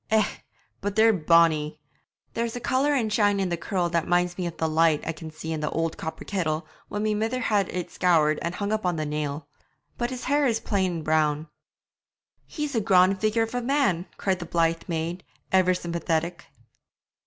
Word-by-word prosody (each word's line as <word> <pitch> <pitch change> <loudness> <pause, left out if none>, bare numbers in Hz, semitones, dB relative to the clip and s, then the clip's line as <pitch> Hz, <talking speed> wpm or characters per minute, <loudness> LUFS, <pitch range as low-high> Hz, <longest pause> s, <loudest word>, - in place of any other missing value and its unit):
Eh! 220 -2 +4 0.6
but 200 0 -3
they're 220 +1 +6
bonny! 160 -3 +3 0.5
There's 230 0 -2
a - - -3
colour 275 +4 +1
and 220 -5 0
shine 205 -2 +3
in 190 -2 0
the 175 - 0
curl 175 +1 -1
that 170 -1 0
minds 175 0 +2
me 180 -1 -2
of 170 - -7
the 160 - 0
lights 160 -1 +2
I - - -1
can 160 0 -8
see 160 +1 -6
in 155 - -3
the 150 - -1
old 165 0 -1
copper 160 - -6
kettle 165 -5 -1 0.2
when 205 0 -3
my 215 0 +1
mither 225 +4 -1
has 210 -4 +1
it 180 -2 -4
scoured 155 -4 +3
and 170 +1 -3
hung 200 0 -2
up 215 0 0
on 180 -1 +1
the 155 -1 -2
nail; 150 0 -3 0.5
but 240 0 0
his 255 -1 -6
hair 285 +1 +2
is 225 -2 +1
plain 185 -7 -1
brown.' 155 0 +1 1.0
'He's 300 -2 -4
a 225 - +1
graun' 185 -1 +5
figure 215 +3 +1
of 225 - -5
a 245 - -1
man!' 235 - +1
cried 190 -2 0
the 175 - -6
blithe 165 0 +1
maid, 170 +1 -3 0.3
ever 185 -1 +4
sympathetic. 170 -1 -2
180 Hz, 200 wpm, -26 LUFS, 165-215 Hz, 1.0 s, they're